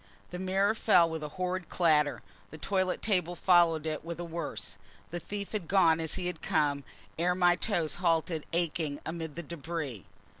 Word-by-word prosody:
The 180 - -5
mirror 190 +3 +2
fell 190 -6 +4
with 160 -1 -4
a 150 - -4
horrid 185 -1 -2
clatter: 150 -4 +2 0.3
the 155 - -10
toilet 185 +3 -1
table 180 -5 +1
followed 170 -3 +4
it 155 -2 -3
with 170 +1 -6
a - - -3
worse: 170 -2 -5 0.3
the 175 - -3
thief 200 +3 -6
had 205 -6 -3
gone 165 -4 +4
as 160 -1 -3
he 185 - -3
had 180 -3 -3
come 145 -2 +1 0.4
ere 180 +1 +2
my 175 -1 +4
toes 170 -7 -1
halted 165 -2 +1
aching 165 -3 -1
amid 160 -2 -5
the 170 - -5
debris. 150 - -5
170 Hz, 180 wpm, -30 LUFS, 160-180 Hz, 0.4 s, fell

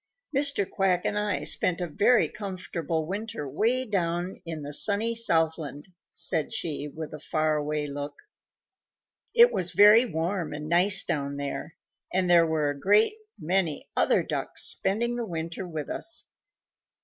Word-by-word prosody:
"Mr. 280 -8 +2
Quack 185 -2 0
and 210 - 0
I 210 -2 -1
spent 180 -1 +1
a 180 - -1
very 205 +9 +3
comfortable 175 -6 -4
winter 200 -3 -5
way 240 - 0
down 180 -3 -2
in 160 -2 -5
the 145 +1 -6
sunny 215 +7 +1
Southland," 160 - -1 0.2
said 155 -3 -1
she 150 -2 -3
with 155 +2 -8
a 155 - -7
far 155 0 0
away 150 0 -2
look. 145 0 -6 1.2
"It 475 0 +7
was 180 -1 -1
very 210 +6 +7
warm 170 -2 -2
and 150 +1 -6
nice 180 +4 +5
down 140 -1 -2
there, 140 +3 -5 0.4
and 185 0 +1
there 170 -1 +5
were 155 -2 0
a 145 - -8
great 205 - +4 0.2
many 175 -2 -1
other - - +3
Ducks - - -3
spending 235 +5 +1
the 240 - -2
winter 165 +1 -5
with 155 -4 -5
us. 335 - -2
175 Hz, 150 wpm, -27 LUFS, 155-205 Hz, 1.2 s, It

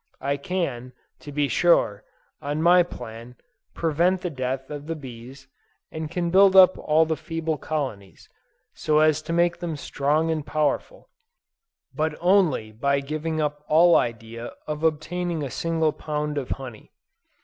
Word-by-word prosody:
I 140 +1 -1
can, 140 -6 -3 0.3
to 145 - -10
be 145 0 0
sure, 115 - +2 0.4
on 145 +1 -3
my 175 +2 +6
plan, 120 -7 -7 0.4
prevent 170 +3 +1
the 180 - -3
death 130 0 -4
of 145 0 -7
the 165 - -3
bees, 130 -1 -11 0.4
and 155 -1 -5
can 170 0 -2
build 195 +1 +6
up 185 -1 +8
all 155 +1 +3
the 160 0 -1
feeble 165 -1 -3
colonies, 130 -11 -5 0.5
so 155 -1 0
as 155 0 +4
to 160 - -6
make 170 +1 +2
them 170 -3 -4
strong 150 +3 0
and 155 -2 -2
powerful: 155 - -2 0.8
but 155 0 -1
only 175 - +2
by 140 +6 0
giving 155 +3 -3
up 150 -1 -2
all 170 +3 +5
idea 115 0 -2
of 150 0 -5
obtaining 165 +1 -1
a 135 - -5
single 160 -2 0
pound 150 -1 -3
of 130 - -7
honey. 125 -5 -7
150 Hz, 150 wpm, -24 LUFS, 135-165 Hz, 0.8 s, up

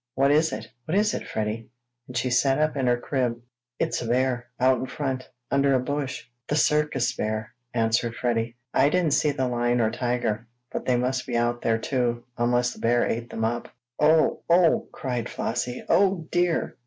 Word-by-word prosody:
"What 135 +1 +3
is 155 +2 +3
it? - - -5 0.2
What 170 +5 0
is 210 0 +3
it, - - -4
Freddie?" 110 +1 -3 0.4
and 125 - -5
she 125 +1 0
sat 135 +2 +3
up 155 0 +1
in 135 -3 0
her 120 0 +3
crib. 120 -2 -1 0.4
"It's - - -1
a 120 - -4
bear 125 0 +1
out 130 0 +4
in 130 - -3
front 130 -2 -3 0.2
under 140 0 +3
a - - +3
bush. 140 +1 -3 0.2
The 150 - 0
circus 150 -4 +2
bear!" 110 0 -3 0.2
answered 115 0 +1
Freddie. 115 -1 -1 0.2
"I 140 +2 +4
didn't 170 -3 +2
see 150 - +3
the 130 -3 0
lion 120 0 +1
or 110 -1 +2
tiger, 120 -2 -1 0.2
but - - -4
they 125 - +3
must 125 +1 -1
be 120 -2 0
out 120 0 0
there 115 -1 +2
too, 120 0 -1
unless 120 +1 +1
the - - -14
bear 120 +1 +2
ate 115 +1 -2
them 110 - -2
up!" 120 +1 -2 0.3
"Oh! 155 +1 +4
Oh!" 170 -1 +4
cried 125 -3 -3
Flossie. 120 +2 -3
"Oh, 190 -5 +3
dear!" 175 -2 +1
125 Hz, 190 wpm, -25 LUFS, 120-145 Hz, 0.4 s, out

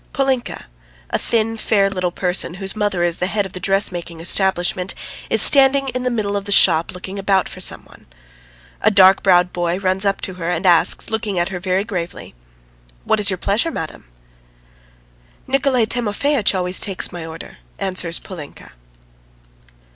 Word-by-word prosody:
Polinka, 265 -3 -2 0.5
a - - 0
thin 225 -1 0
fair 205 -3 +1
little 185 -2 -2
person 180 -1 0
whose 195 +1 -4
mother 205 -4 -1
is 170 -1 +1
the 180 - -1
head 205 +1 -2
of 190 - -10
a - - -5
dressmaking 180 -3 0
establishment, 180 +1 +2 0.3
is - - +6
standing 275 0 +5
in 255 0 -4
the 250 - -1
middle 210 -4 -2
of 200 -1 -3
the 205 - -6
shop 170 -3 +3
looking 190 +2 -8
about 195 -1 +1
for 185 - -9
some - - +1
one. - - -20 0.7
A 215 - +4
dark 195 -1 +5
browed 180 -2 +2
boy 175 0 -2
runs 190 0 +1
up 195 -1 0
to 190 - -5
her 165 - -2
and 175 +2 -3
asks, 175 +3 +3
looking 215 -3 -3
at 175 +1 0
her 185 -2 -6
very 185 +1 -1
gravely: 180 -6 -7 0.7
"What - - +1
is 205 - +5
your 190 - -2
pleasure, 205 - -1
madam?" 160 - -7 1.4
"Nikolay 260 -3 +1
Timofeitch 230 +1 -1
always 180 0 0
takes 195 -2 -3
my 175 -2 -8
order," 160 0 -11 0.2
answers 185 -3 -1
Polinka. 160 -7 -11
190 Hz, 170 wpm, -18 LUFS, 180-210 Hz, 1.4 s, is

